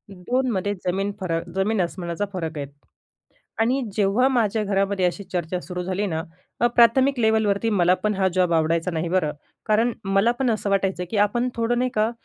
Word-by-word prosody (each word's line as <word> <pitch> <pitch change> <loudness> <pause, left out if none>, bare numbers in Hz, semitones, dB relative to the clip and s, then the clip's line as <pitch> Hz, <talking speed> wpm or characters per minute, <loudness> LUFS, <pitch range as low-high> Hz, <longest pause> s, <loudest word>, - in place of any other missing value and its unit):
2मध्ये 205 0 -1
जमीन 195 +3 0
फरक 170 -3 -2
जमीन 195 +1 +1
आसमानाचा 175 +2 -3
फरक 165 -4 -4
आहेत. 140 -1 -4 0.9
आणि 250 +4 +2
जेव्हा 210 +5 +3
माझ्या 225 -4 +1
घरामध्ये 195 -1 0
अशी 180 +3 -2
चर्चा 175 0 -2
सुरू 180 +4 -5
झाली 190 +3 -2
ना, 160 -3 -2
तेव्हा 180 +8 -3
प्राथमिक 260 +3 +4
लेवलवरती, 220 -1 +2
मला 180 -4 +3
पण 210 - +1
हा 190 -1 +2
जॉब 180 -2 +2
आवडायचा 165 +2 +1
नाही 165 0 -2
बरं. 180 -5 +1 0.3
कारण 225 +2 +2
मला 195 +4 +3
पण 260 -2 +2
असं 215 -2 -2
वाटायचं 195 -2 0
की 220 - -1
आपण 240 +4 -1
थोडं 235 +1 0
नाही 255 0 +1
का 215 +1 +2
195 Hz, 175 wpm, -23 LUFS, 180-225 Hz, 0.9 s, प्राथमिक